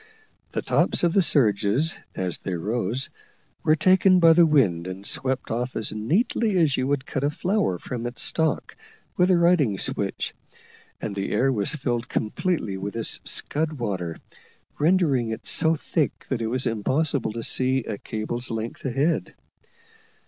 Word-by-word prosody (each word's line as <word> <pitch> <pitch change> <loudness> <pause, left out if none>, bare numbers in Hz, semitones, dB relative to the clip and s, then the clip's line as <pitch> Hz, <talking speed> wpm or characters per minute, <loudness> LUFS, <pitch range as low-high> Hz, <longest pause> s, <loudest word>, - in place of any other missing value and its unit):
The - - -2
tops - - +1
of 170 -1 +3
the 195 - +4
surges, 125 - +3 0.2
as 90 -2 -2
they 95 - -4
rose, 110 +7 -2 0.5
were 155 - +3
taken 185 +3 +4
by 165 -1 +7
the 170 0 +5
wind 95 - +2
and 95 +2 -7
swept 130 +1 0
off 125 +2 -2
as 110 -2 0
neatly 190 - 0
as 155 -6 +3
you 130 - -1
would 140 -1 -1
cut 135 - -3
a 145 - +2
flower 180 - 0
from 120 +6 -5
its 120 - -3
stalk 160 -1 0 0.4
with 180 +1 +3
a 185 - +5
riding 170 - +3
switch - - -2 0.7
and 105 - -4
the 100 0 -3
air 135 +1 +2
was 110 +5 +1
filled 120 -4 -2
completely 110 - -2
with 100 +2 -5
this 115 -1 +1
scud 155 +1 -1
water, 95 - -4 0.6
rendering 150 -7 +2
it 110 0 -6
so 160 0 +2
thick 155 0 -2
that 130 -4 -1
it 115 - -1
was 125 +3 -1
impossible 130 +2 0
to 115 0 -5
see 130 0 +2
a 105 -3 -5
cable's 120 +3 -4
length 115 0 -5
ahead. 135 +6 0
130 Hz, 165 wpm, -24 LUFS, 110-160 Hz, 0.7 s, by